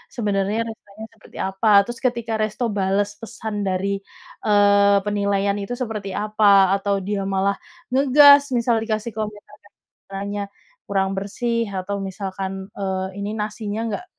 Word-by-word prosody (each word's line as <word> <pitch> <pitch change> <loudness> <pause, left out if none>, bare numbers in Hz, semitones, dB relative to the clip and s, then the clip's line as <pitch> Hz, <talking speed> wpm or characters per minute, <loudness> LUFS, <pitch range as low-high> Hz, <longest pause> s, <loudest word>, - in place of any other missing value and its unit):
sebenarnya 205 -2 0
restonya 220 -1 -10
seperti 220 - -17
apa, 195 +3 -2 0.2
terus 240 0 -7
ketika 235 -2 -1
resto 215 +3 -2
bales 200 +1 0
pesan 220 -1 -6
dari, 195 +1 -1 0.4
eee, 205 -1 +5
penilaian 200 -1 0
itu 200 +5 -4
seperti 215 -5 -4
apa, 205 -2 +4
atau 200 0 0
dia 205 -1 -1
malah 195 +1 +1 0.4
ngegas 285 +2 +7 0.2
misal 235 0 +2
dikasih 220 0 -2
komentar 210 -1 -6
restorannya 200 0 -8 0.5
kurang 195 -1 0
bersih 230 +4 -1
atau 200 +2 -3
misalkan, 190 0 -5 0.3
eee, 190 -1 -2 0.2
ini, 205 - -3
nasinya 210 0 -4
nggak 360 - -5
205 Hz, 130 wpm, -22 LUFS, 195-220 Hz, 0.5 s, ngegas